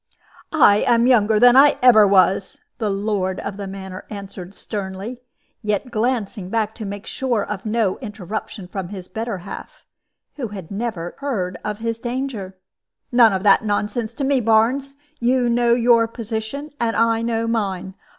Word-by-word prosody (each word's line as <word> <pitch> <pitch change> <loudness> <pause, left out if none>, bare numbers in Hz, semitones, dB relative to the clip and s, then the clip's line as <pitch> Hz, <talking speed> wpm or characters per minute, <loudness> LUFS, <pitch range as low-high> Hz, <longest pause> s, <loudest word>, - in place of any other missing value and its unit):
"I 210 -9 +6
am 235 0 +4
younger 220 -4 +4
than 245 +1 +7
ever 255 -5 +7
I - - +2
was," 195 0 +3 0.2
the 220 -3 0
lord 195 -2 -1
of 200 -1 -5
the 200 -1 -5
manor 190 -1 -8
answered, 195 -2 -8
sternly, 205 +4 -6 0.4
yet 210 +3 -2
glancing 215 -5 -1
back 220 0 -1
to 220 - -7
make 200 +1 -6
sure 240 -6 -1
of 210 0 -5
no 215 -3 0
interruption 205 -3 -6
from 185 -1 -5
his 190 -3 -8
better 225 +1 -4
half - - -9 0.5
who 255 -5 -3
had 195 -5 -9
not 225 +3 -2
even 170 -2 -6
heard 195 -11 -3
of 210 -1 -3
his 230 0 -3
danger. 240 -6 -4 0.5
"None 240 -3 +6
of 190 -1 -2
that 200 +1 +5
nonsense 210 +2 -2
to 280 - -3
me, 270 0 +2
Barnes. 240 +5 +2 0.2
You 245 +1 +2
know 235 0 +3
your 235 -1 +4
position, 230 +6 -5
and 230 -1 0
I 230 0 +2
know 230 -1 -1
mine. 195 -5 -2
220 Hz, 165 wpm, -21 LUFS, 195-240 Hz, 0.5 s, than